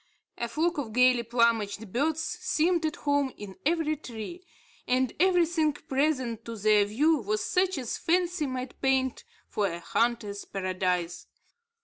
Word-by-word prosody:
A 235 - -1
flock 320 +6 0
of 225 -6 -5
gayly 250 0 +5
plumaged 225 -3 0
birds 310 +5 +1
seemed 325 +1 0
at 310 - -4
home 285 -2 0
in 195 -2 -9
every 325 -2 +1
tree; 270 - -8 0.4
and 255 -1 +1
everything 340 -4 +3
presented 265 -5 -1
to 230 - -6
their 210 0 +4
view 295 +10 +2
was 215 -1 -1
such 370 -1 +1
as 250 -4 -3
fancy 350 -2 +1
might 255 -1 -5
paint 265 -1 +1 0.2
for 205 -1 0
a 170 -2 -4
hunter's 210 +2 -1
paradise. 185 -2 -2
255 Hz, 140 wpm, -28 LUFS, 215-310 Hz, 0.4 s, gayly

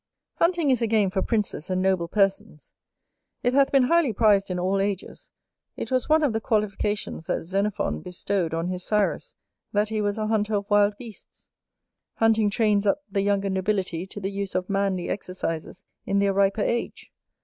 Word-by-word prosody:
Hunting 335 -4 +2
is 250 - +1
a 230 - +2
game 210 -3 +2
for 190 - 0
princes 210 -7 -2
and 185 0 0
noble 185 -2 +1
persons; 195 -3 -1 0.7
it 245 0 +2
hath 275 0 +4
been 275 -2 +5
highly 295 -2 +3
prized 205 -2 +3
in 180 - -2
all 190 +2 0
ages; 195 -1 -4 0.5
it - - -5
was 255 +2 0
one 315 0 +4
of 275 -6 +2
the 220 - -1
qualifications 210 -5 -2
that - - -1
Xenophon 190 - -1
bestowed 180 -1 -2
on 165 +1 -2
his 180 0 -4
Cyrus, 210 0 -1 0.4
that 210 +1 +1
he 220 -1 -1
was 205 0 -1
a 215 - -1
hunter 215 -1 0
of 200 0 -2
wild 205 0 +4
beasts. 230 -3 -13 0.7
Hunting 225 -2 +3
trains 210 -1 +1
up 285 +9 +1
the 195 - +1
younger 200 -1 0
nobility 190 -2 -1
to 205 - -8
the 195 0 -3
use 200 -1 -4
of 185 +2 -1
manly 195 -2 0
exercises 180 -4 -5 0.2
in 200 - -1
their 200 0 +2
riper 200 +1 +2
age. 235 - -3
200 Hz, 180 wpm, -25 LUFS, 190-220 Hz, 0.7 s, been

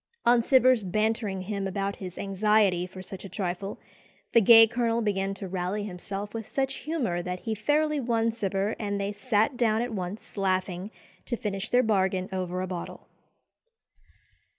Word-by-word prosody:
On 240 0 +5
Cibber's 255 -1 +4
bantering 210 0 -1
him 200 0 -3
about 195 +1 -2
his 185 -2 -8
anxiety 195 -2 +2
for 185 0 -10
such 190 0 -8
a 195 - -8
trifle, 185 +1 -3 0.6
the 230 - +7
gay 225 +2 +9
colonel 230 0 0
began 195 -2 -1
to 195 - -6
rally 185 +3 -2
himself 200 +1 -6
with 225 -2 -5
such 270 +1 -1
humour 260 - -2
that 180 0 -5
he 225 - -2
fairly 295 +7 +1
won 230 -2 +1
Cibber, 200 -1 -1
and 205 -2 -2
they 200 +1 -1
sat 220 +3 +1
down 225 -2 +2
at 245 -1 -4
once, 190 +2 -6
laughing, 185 0 -1 0.4
to 240 - -2
finish 195 -3 -3
their 250 +1 +4
bargain 190 -3 +1
over 185 -1 -2
a - - -3
bottle. 180 -2 -6
205 Hz, 165 wpm, -27 LUFS, 190-225 Hz, 0.6 s, gay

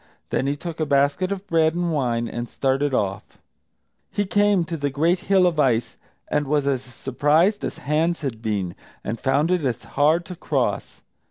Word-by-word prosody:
Then 135 - 0
he 145 +1 -1
took 165 +1 -7
a 155 - +1
basket 140 +7 +2
of 200 0 -4
bread 160 -2 +2
and 175 -1 -1
wine, 120 -5 0
and 120 +1 -5
started 135 +1 0
off. 100 -4 -2 0.7
He 205 - -1
came 205 -2 +3
to 165 0 -4
the 145 -2 -1
great 165 +6 +1
hill 190 -1 +3
of 170 -3 +1
ice, 120 -5 +2 0.3
and 145 -1 0
was 145 0 +1
as 135 -3 +1
surprised 145 - +1
as - - -3
Hans 160 +5 0
had 125 -7 -4
been, 100 -6 -2 0.3
and 115 +3 -4
found 145 +5 +1
it 180 -3 +1
as 125 -3 -2
hard 155 +4 +2
to 180 - -8
cross. - - -2
145 Hz, 185 wpm, -23 LUFS, 130-170 Hz, 0.7 s, came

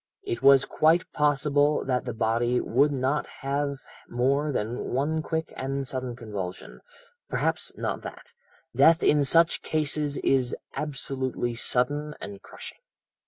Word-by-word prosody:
It 380 -3 -4
was 135 -1 +6
quite 165 +3 +3
possible 145 0 +2
that 125 -2 -1
the 120 - -3
body 120 +2 +1
would 140 +5 +2
not 135 +2 -1
have 140 0 -2 0.3
more 140 +5 +1
than 115 -2 -3
one 150 +5 0
quick 160 +1 -3
and 135 0 -3
sudden 130 -2 -4
convulsion, 100 -6 -7 0.5
perhaps - - 0
not - - -3
that; - - -10 0.4
death 165 0 +5
in 145 -1 +4
such 165 +4 +3
cases 150 -2 0
is 130 -2 +2 0.2
absolutely 130 -4 -2
sudden 145 +5 0
and 100 -1 -8
crushing.' - - -10
140 Hz, 130 wpm, -26 LUFS, 125-150 Hz, 0.5 s, was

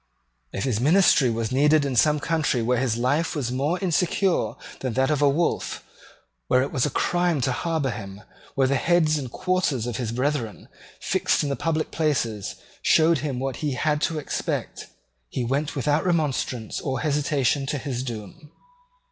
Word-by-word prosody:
If 95 - -3
his 120 -6 0
ministry 150 -2 +4
was 115 0 -2
needed 145 +3 +4
in 135 -2 -2
some 150 +4 +4
country 145 -6 0
where 125 +1 +1
his 120 -3 0
life 145 +8 0
was 130 -5 -2
more 140 +7 0
insecure 175 - +1 0.2
than 130 -3 -3
that 130 +3 +2
of 150 -1 0
a 145 - +5
wolf, 165 +5 -1 0.6
where 130 - +3
it 140 - -4
was 130 +1 +1
a - - -1
crime 175 0 +1
to 130 - +1
harbour 155 +1 -1
him, 100 -1 -8 0.3
where 135 - +3
the 135 +1 +2
heads 155 0 +2
and 130 -4 -6
quarters 180 -10 0
of 120 - -3
his 120 -4 -3
brethren, 125 -3 -2 0.3
fixed - - +1
in 145 - -1
the 140 - -1
public 160 0 -1
places, 120 -10 -1 0.3
showed 160 -1 +4
him 140 -3 -3
what 130 -1 -3
he 150 -3 -2
had 150 +3 0
to 160 - 0
expect, 150 - -3 0.4
he 125 - -2
went 140 +5 -1
without 145 +3 +1
remonstrance 145 - -1
or 130 -2 -2
hesitation 145 -2 +1
to 145 - -1
his 130 -3 -4
doom. 120 - -8
140 Hz, 175 wpm, -24 LUFS, 125-155 Hz, 0.6 s, a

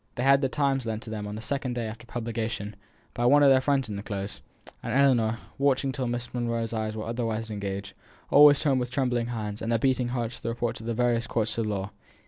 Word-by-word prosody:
They 120 - -2
had 135 +1 +5
The 135 - +1
Times 135 -3 0
lent 110 +1 -3
to 110 - -8
them 105 -1 -4
on 105 - -5
the 110 - -7
second 135 -1 -2
day 120 -2 -2
after 110 +2 -8
publication 115 -3 -4 0.4
by 120 +1 +1
one 145 +3 +6
of 140 - +7
their 130 -1 +5
friends 135 -1 +1
in 105 -2 -5
the - - -4
Close, 100 -1 -5 0.4
and - - -4
Ellinor, 125 -5 +3 0.2
watching 135 -1 +2
till 130 -1 -3
Miss 120 0 -4
Monro's 115 -2 -2
eyes 110 -1 -2
were 110 - -4
otherwise 115 -1 -2
engaged, 100 -1 -4 0.4
always 145 -1 +8
turned 135 -4 +2
with 125 -1 -2
trembling 125 -2 0
hands 105 -3 -4
and 115 - -2
a 115 - +3
beating 130 0 +1
heart 120 -2 -2
to - - -9
the 115 - -3
reports 115 0 -2
of 110 - -8
the 115 - -1
various 120 -1 +1
courts 110 -2 -1
of 110 - 0
law. 100 -1 -3
115 Hz, 240 wpm, -27 LUFS, 110-130 Hz, 0.4 s, always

